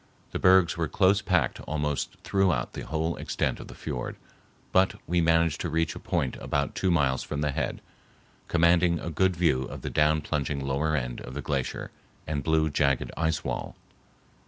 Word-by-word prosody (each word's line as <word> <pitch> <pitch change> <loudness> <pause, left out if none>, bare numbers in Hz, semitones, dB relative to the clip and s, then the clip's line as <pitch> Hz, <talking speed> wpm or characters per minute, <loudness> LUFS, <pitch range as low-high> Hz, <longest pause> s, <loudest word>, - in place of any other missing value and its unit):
The - - -3
bergs 90 -2 +5
were 85 -1 0
close 100 +4 +3
packed 90 -4 +1
almost 75 -2 -2
throughout 95 -2 +1
the - - -6
whole 80 +2 -1
extent - - -2
of - - -9
the - - -11
fiord, - - -4 0.6
but 95 +1 +3
we 85 +1 +1
managed 80 -2 +2
to 85 - -2
reach 80 +1 0
a - - -8
point 65 - -1
about 70 -1 -1
two 95 - 0
miles 70 -6 +2
from 75 -1 -4
the 75 -1 +1
head—commanding 85 +4 -1
a 85 - -5
good 95 +3 +2
view 80 -6 +2
of - - -8
the - - -3
down 75 +1 +3
plunging 70 -2 -2
lower 75 +3 0
end 60 -4 -3
of 60 - -8
the 75 - -3
glacier 70 -2 -2 0.3
and 75 -2 -2
blue, 80 0 +2
jagged 70 -2 +1
ice 80 0 0
wall. - - -4
80 Hz, 180 wpm, -27 LUFS, 70-85 Hz, 0.6 s, bergs